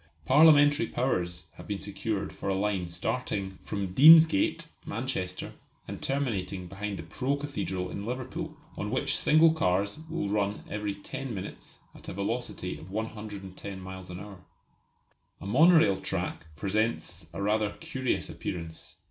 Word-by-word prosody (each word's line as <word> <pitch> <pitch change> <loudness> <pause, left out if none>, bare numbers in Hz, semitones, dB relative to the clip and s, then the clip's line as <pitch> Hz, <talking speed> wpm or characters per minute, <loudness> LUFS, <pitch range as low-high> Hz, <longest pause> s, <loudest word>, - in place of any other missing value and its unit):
Parliamentary 145 - +6
powers 90 -9 -1
have - - -10
been - - -2
secured - - -3
for - - -4
a 95 - +1
line 95 -2 0
starting 95 +2 -3
from 100 -3 -4
Deansgate, 160 - +7 0.2
Manchester, 100 -6 -3 0.3
and - - -6
terminating 100 -10 -2
behind 100 +2 -5
the 85 - -6
pro 130 - -1
Cathedral 100 -10 -3
in 100 - -5
Liverpool, 125 +3 -5 0.2
on - - -3
which - - +1
single 160 +1 +5
cars 100 - 0
will 165 -10 -2
run 100 0 -1
every 105 -1 -3
ten 120 +4 -6
minutes 95 - -8 0.2
at - - -10
a - - -5
velocity 115 +6 -3
of 85 - -11
110 100 -2 -6
miles 95 0 -8
an 90 0 -6
hour. 100 -1 -10 1.0
A - - -9
monorail 125 - +5
track 90 -4 -3
presents 100 -2 -1
a 85 - -7
rather 105 +1 +1
curious 130 -6 -2
appearance. 85 -2 -6
100 Hz, 140 wpm, -29 LUFS, 95-130 Hz, 1.0 s, Deansgate